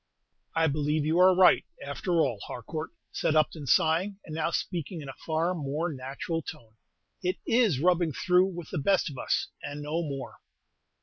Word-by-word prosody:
"I 165 - +3
believe 150 0 0
you 160 +3 +2
are 185 0 +7
right, 185 -1 +6 0.2
after 165 +4 0
all, 125 -8 0
Harcourt," 155 +6 -5 0.2
said 155 - 0
Upton, 155 -1 +1
sighing, 170 - +3
and 155 - -8
now 160 +1 0
speaking 170 0 -3
in 145 -3 -8
a - - -6
far 165 +3 +1
more 155 +1 -2
natural 145 +6 -4
tone; 115 -6 -10 0.5
"it 185 +1 0
is 225 - +3
'rubbing 175 0 +3
through' 180 +7 +3
with 175 -3 -8
the 175 - -1
best 185 +1 +2
of 135 - -8
us, - - 0
and 145 +1 -6
no 155 +3 -1
more!" 140 -5 -6
160 Hz, 175 wpm, -28 LUFS, 145-180 Hz, 0.5 s, are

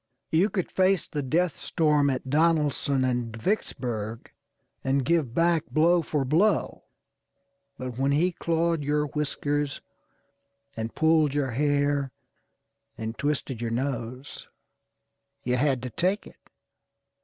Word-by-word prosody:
You 175 +6 +3
could 185 -5 -3
face 190 -1 +2
the 150 - -3
death 165 +5 +1
storm 150 -3 +2
at 130 -1 -3
Donelson 145 -2 +2
and 120 -3 -1
Vicksburg, 115 - -3 0.5
and 135 -1 +1
give 160 -8 +1
back 165 -1 +2
blow 170 +3 +3
for 150 -3 -1
blow; 175 +10 +1 0.9
but 130 -1 -6
when 135 +1 +2
he 165 +6 +2
clawed 165 -2 0
your 150 +1 +1
whiskers, 145 -1 -2 1.0
and 115 0 -5
pulled 160 -3 +3
your 140 -3 0
hair, 145 +1 +1 0.9
and 110 0 -4
twisted 140 -4 -2
your 115 - -1
nose, 125 +1 -4 1.0
you 125 0 +1
had 130 -2 +1
to 125 - -5
take 185 +4 0
it. - - -17
145 Hz, 120 wpm, -26 LUFS, 130-160 Hz, 1.0 s, You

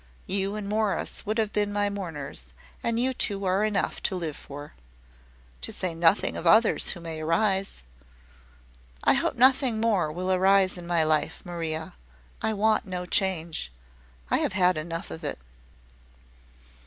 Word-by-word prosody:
You 195 +1 -1
and 210 -2 -5
Morris 210 -1 -1
would 215 +2 0
have 215 -2 0
been 205 -1 +1
my 205 0 +1
mourners, 165 - -5 0.4
and 230 0 0
you 260 +2 +1
two 200 -5 -1
are 190 +2 +2
enough 210 -2 0
to - - -1
live 165 -5 -3
for." 145 +1 -10 0.9
"To 65 - -2
say 180 -2 -2
nothing 165 +4 +3
of 170 - -3
others 220 +6 +5
who 175 - -3
may 165 -2 -6
arise." 190 - 0 1.2
"I - - +5
hope - - 0
nothing 255 -2 +4
more 205 -9 +1
will 180 +4 -2
arise 190 +1 +4
in 175 -1 -8
my 170 -2 +2
life, 155 -1 0
Maria. 160 -2 -4 0.5
I 220 - 0
want 215 0 +2
no 180 -1 -4
change. 170 - 0 0.6
I - - +3
have - - 0
had 185 -2 +3
enough 165 +2 -5
of 160 - -7
it." 145 - -2
185 Hz, 155 wpm, -27 LUFS, 165-205 Hz, 1.2 s, others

